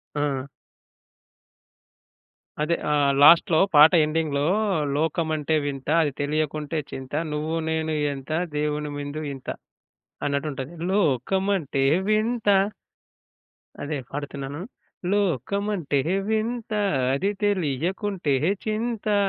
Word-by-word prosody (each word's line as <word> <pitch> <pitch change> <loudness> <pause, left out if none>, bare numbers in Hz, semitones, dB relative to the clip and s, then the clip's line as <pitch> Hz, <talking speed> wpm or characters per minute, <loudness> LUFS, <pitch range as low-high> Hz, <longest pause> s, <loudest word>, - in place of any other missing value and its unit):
ఆ! 140 -3 -1 2.2
అదే 160 +3 +1 0.2
ఆహ్, 145 -1 +3
లాస్ట్‌లో 165 +1 +7 0.2
పాట 150 +2 +9
ఎండింగ్‌లో 150 -2 0 0.5
'లోకమంటే 155 0 0
వింతా, 140 +1 -2
అది 145 - 0
తెలియకుంటే 155 +1 -1
చింతా, 135 +3 -4
నువ్వు 155 +2 -2
నేను 160 0 -1 0.2
ఎంత, 135 +2 -8 0.3
దేవుని 150 0 -1
మందు 145 +2 -5
ఇంత' 135 -1 -6 0.7
అన్నట్టుంటది. 140 0 -3 0.2
లోకమంటే 190 - +1 0.3
వింతా. 215 -2 +3 1.3
అదే 150 +1 -3
పాడుతున్నాను. 145 +1 -5 0.5
లోకమంటే 200 - 0 0.3
వింతా, 220 0 -1 0.3
అది 190 +9 0
తెలియకుంటే 185 - 0 0.3
చింతా, 215 -1 -1
155 Hz, 85 wpm, -24 LUFS, 145-195 Hz, 2.2 s, పాట